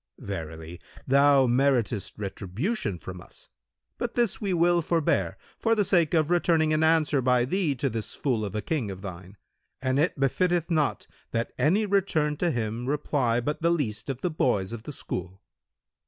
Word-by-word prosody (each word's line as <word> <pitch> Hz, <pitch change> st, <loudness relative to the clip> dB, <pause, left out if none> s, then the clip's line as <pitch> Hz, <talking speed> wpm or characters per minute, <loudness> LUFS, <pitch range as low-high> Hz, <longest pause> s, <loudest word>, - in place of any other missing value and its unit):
Verily, 80 Hz, -2 st, -7 dB, 0.2 s
thou 140 Hz, 0 st, +5 dB
meritest 120 Hz, -4 st, +1 dB
retribution 105 Hz, -, -3 dB
from 90 Hz, +2 st, -8 dB
us, -, -, -16 dB, 0.5 s
but 240 Hz, -1 st, -3 dB
this 235 Hz, -3 st, 0 dB
we 200 Hz, -2 st, -1 dB
will 175 Hz, 0 st, +3 dB
forbare, 165 Hz, -1 st, 0 dB, 0.2 s
for 230 Hz, 0 st, +2 dB
the 210 Hz, -, +2 dB
sake 175 Hz, -4 st, +2 dB
of 155 Hz, 0 st, +2 dB
returning 165 Hz, -3 st, +3 dB
an 155 Hz, -, +2 dB
answer 160 Hz, -3 st, +3 dB
by 125 Hz, -1 st, +3 dB
thee 160 Hz, 0 st, 0 dB
to 135 Hz, +2 st, -1 dB
this 115 Hz, -4 st, -4 dB
fool 125 Hz, -6 st, -1 dB
of 100 Hz, -1 st, -4 dB
a 105 Hz, -, -2 dB
King 130 Hz, -4 st, -1 dB
of 95 Hz, 0 st, -8 dB
thine: 95 Hz, +1 st, -9 dB, 0.4 s
and 130 Hz, +1 st, 0 dB
it 155 Hz, -1 st, +1 dB
befitteth 175 Hz, +5 st, +1 dB
not 155 Hz, -3 st, +1 dB, 0.2 s
that 115 Hz, 0 st, -2 dB
any 195 Hz, +8 st, +3 dB
return 185 Hz, -7 st, +1 dB
to 175 Hz, -, +1 dB
him 115 Hz, -2 st, -2 dB
reply 135 Hz, -4 st, +1 dB
but 150 Hz, +7 st, -3 dB
the 170 Hz, -, +3 dB
least 140 Hz, -10 st, -1 dB
of 135 Hz, -1 st, -4 dB
the 180 Hz, -, -1 dB
boys 105 Hz, -10 st, 0 dB
of 115 Hz, -1 st, -6 dB
the 150 Hz, -, -8 dB
school." 95 Hz, -8 st, -5 dB
140 Hz, 175 wpm, -27 LUFS, 110-165 Hz, 0.5 s, thou